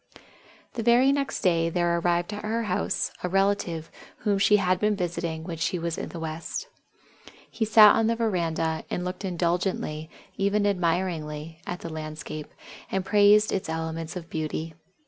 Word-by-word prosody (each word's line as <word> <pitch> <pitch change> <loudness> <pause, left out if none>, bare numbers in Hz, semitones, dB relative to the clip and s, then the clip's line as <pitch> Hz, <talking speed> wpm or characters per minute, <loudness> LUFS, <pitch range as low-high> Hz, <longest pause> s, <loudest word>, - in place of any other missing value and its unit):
The 235 - -3
very 240 +4 +5
next 280 -1 -1
day 165 -2 +2
there 175 0 +1
arrived 175 +3 0
at 205 - -6
her 225 +2 -1
house 185 -4 -1
a 180 - -2
relative 195 -4 0 0.3
whom 200 -2 +2
she 210 +1 +5
had 185 -2 +1
been 210 +1 +2
visiting 170 -3 -3
when 165 -1 -5
she 170 +3 -1
was 170 -1 -2
in - - -5
the 170 - -7
West. 160 0 -5 0.8
He 225 - -1
sat 215 -1 +8
on 225 - +2
the 230 - +2
veranda, 165 -7 -1
and 180 - -2
looked 180 +2 -5
indulgently 175 -3 -1 0.3
even 200 +1 +1
admiringly 165 -4 -1
at 180 - -4
the 165 - -6
landscape, 155 -1 -6 0.4
and 190 -1 -1
praised 210 +1 +5
its 190 - -2
elements 160 +1 -4
of 175 -2 -6
beauty. 160 0 -4
180 Hz, 165 wpm, -26 LUFS, 165-205 Hz, 0.8 s, sat